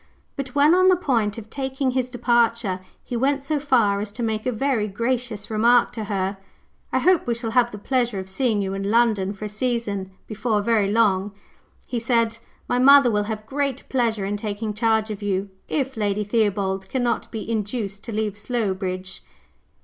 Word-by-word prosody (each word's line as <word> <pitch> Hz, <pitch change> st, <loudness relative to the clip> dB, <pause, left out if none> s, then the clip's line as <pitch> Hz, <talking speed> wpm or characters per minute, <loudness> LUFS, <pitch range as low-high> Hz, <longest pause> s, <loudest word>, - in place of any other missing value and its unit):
But, 275 Hz, -2 st, -5 dB
when 290 Hz, +3 st, +5 dB
on 370 Hz, +1 st, +5 dB
the 370 Hz, -, +6 dB
point 235 Hz, -, 0 dB
of 220 Hz, -2 st, -8 dB
taking 265 Hz, -1 st, -1 dB
his 255 Hz, -1 st, -1 dB
departure, 235 Hz, -5 st, +1 dB, 0.2 s
he 245 Hz, -, -5 dB
went 270 Hz, +3 st, +1 dB
so 295 Hz, +1 st, 0 dB
far 235 Hz, -8 st, +2 dB
as 205 Hz, 0 st, -4 dB
to 240 Hz, -, -4 dB
make 220 Hz, +1 st, -2 dB
a -, -, +2 dB
very 240 Hz, -2 st, 0 dB
gracious 230 Hz, 0 st, -2 dB
remark 235 Hz, +3 st, +4 dB
to 220 Hz, -2 st, -5 dB
her. 195 Hz, -1 st, -2 dB, 0.5 s
"I -, -, +1 dB
hope 370 Hz, -6 st, +3 dB
we 235 Hz, -, +1 dB
shall 230 Hz, -1 st, -4 dB
have 240 Hz, 0 st, +3 dB
the 210 Hz, -, -8 dB
pleasure 240 Hz, 0 st, 0 dB
of 190 Hz, 0 st, -5 dB
seeing 215 Hz, 0 st, 0 dB
you 190 Hz, 0 st, -3 dB
in 195 Hz, 0 st, -3 dB
London 220 Hz, -4 st, +2 dB
for 205 Hz, +1 st, -7 dB
a -, -, -4 dB
season, 210 Hz, -4 st, -2 dB, 0.2 s
before 215 Hz, -1 st, -1 dB
very 210 Hz, -3 st, +2 dB
long," 205 Hz, -3 st, +2 dB, 0.5 s
he 245 Hz, -, -3 dB
said: 230 Hz, -1 st, +1 dB, 0.3 s
"my 245 Hz, -, +1 dB
mother 275 Hz, -1 st, +7 dB
will 210 Hz, -1 st, +1 dB
have 215 Hz, 0 st, -5 dB
great 275 Hz, +1 st, -2 dB
pleasure 230 Hz, -6 st, 0 dB
in 205 Hz, +1 st, -2 dB
taking 210 Hz, +1 st, -4 dB
charge 220 Hz, 0 st, +1 dB
of 210 Hz, 0 st, -6 dB
you, 200 Hz, -1 st, -1 dB, 0.2 s
if 270 Hz, -2 st, -1 dB
Lady 210 Hz, -1 st, 0 dB
Theobald 200 Hz, -3 st, 0 dB
cannot 245 Hz, -3 st, -1 dB
be 220 Hz, -2 st, -6 dB
induced 210 Hz, -2 st, -3 dB
to 230 Hz, -, -5 dB
leave 210 Hz, -1 st, -2 dB
Slowbridge." 190 Hz, -5 st, -3 dB
225 Hz, 190 wpm, -23 LUFS, 205-245 Hz, 0.5 s, mother